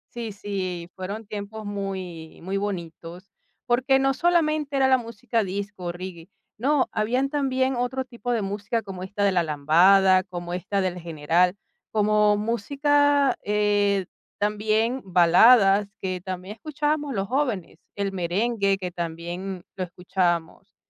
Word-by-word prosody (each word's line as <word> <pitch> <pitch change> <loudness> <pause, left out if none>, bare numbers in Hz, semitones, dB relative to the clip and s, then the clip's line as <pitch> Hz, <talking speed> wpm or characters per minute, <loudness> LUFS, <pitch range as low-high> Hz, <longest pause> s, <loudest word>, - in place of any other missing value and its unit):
Sí, 230 -2 -4
sí, 185 -4 -5
fueron 200 +4 -6
tiempos 210 +1 -7
muy, 190 -5 -6
muy 195 +2 -2
bonitos, 180 -1 -6 0.3
porque 260 +2 +3
no 270 0 +2
solamente 310 -3 +1
era 270 -1 +4
la 260 -1 +4
música 230 0 -2
disco 200 0 -5
o 175 - -1
reggae, 175 0 -9 0.3
no, 275 +2 +2
habían 250 +6 0
también 265 -2 0
otro 250 +2 -2
tipo 245 0 -5
de 225 -4 0
música 205 +3 -2
como 190 -2 -8
esta 200 +2 -3
de 200 - +4
la 180 - +2
lambada, 180 +5 +5
como 175 -2 -7
esta 195 +2 -1
del 180 -1 -2
general, 170 +3 +1 0.3
como 210 -1 +3
música, 280 +5 +2
eh, 205 -2 +2 0.3
también 215 +4 0
baladas, 195 +3 +5
que 185 -2 -3
también 185 +1 -6
escuchábamos 295 -1 -2
los 195 0 -1
jóvenes, 250 - -2 0.2
el 200 -1 -2
merengue, 195 +3 0
que 180 -2 -5
también 175 +2 -5
lo 185 - -3
escuchábamos. 175 -2 -2
200 Hz, 140 wpm, -25 LUFS, 180-240 Hz, 0.3 s, lambada